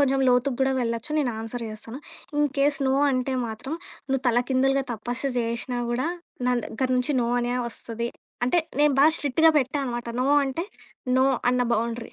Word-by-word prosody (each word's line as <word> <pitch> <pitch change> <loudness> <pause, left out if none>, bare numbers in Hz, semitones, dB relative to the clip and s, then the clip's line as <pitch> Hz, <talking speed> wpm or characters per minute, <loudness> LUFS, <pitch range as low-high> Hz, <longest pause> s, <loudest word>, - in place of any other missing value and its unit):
కొంచెం 270 -1 +3
లోతు‌గా 250 +2 +3
గూడా 265 0 +3
వెళ్ళొచ్చు 230 +3 -2
నేనాన్సర్ 235 -3 -2
జేస్తాను. 220 +4 -7 0.4
ఇన్‌కేస్ 285 0 +2
నో 265 - +3 0.2
అంటే 260 0 0
మాత్రం, 225 +6 -6 0.4
నువ్వు 270 -1 +1
తలకిందులుగా 260 +3 +2
తపస్సు 245 +5 -3
జేసినా 235 +1 -2
గూడా 250 +5 0 0.4
నా 250 - +3
దెగ్గర 260 +3 -2
నుంచి 250 +4 +1
నో 235 - +1
అనే 240 0 -1 0.2
ఒస్తది. 235 0 -5 0.4
అంటే, 340 +8 +3 0.2
నేను 295 -1 +4
బాగా 310 +3 +6
స్ట్రిక్ట్‌‌గా 320 +3 +4
పెట్టా 270 +1 -1
అనమాట, 240 -2 -4
నో 255 - +1 0.2
అంటే 275 +6 -2 0.5
నో 260 - +5 0.2
అన్న 250 0 +2
బౌండరీ. 230 +1 -3
250 Hz, 160 wpm, -25 LUFS, 235-275 Hz, 0.5 s, బాగా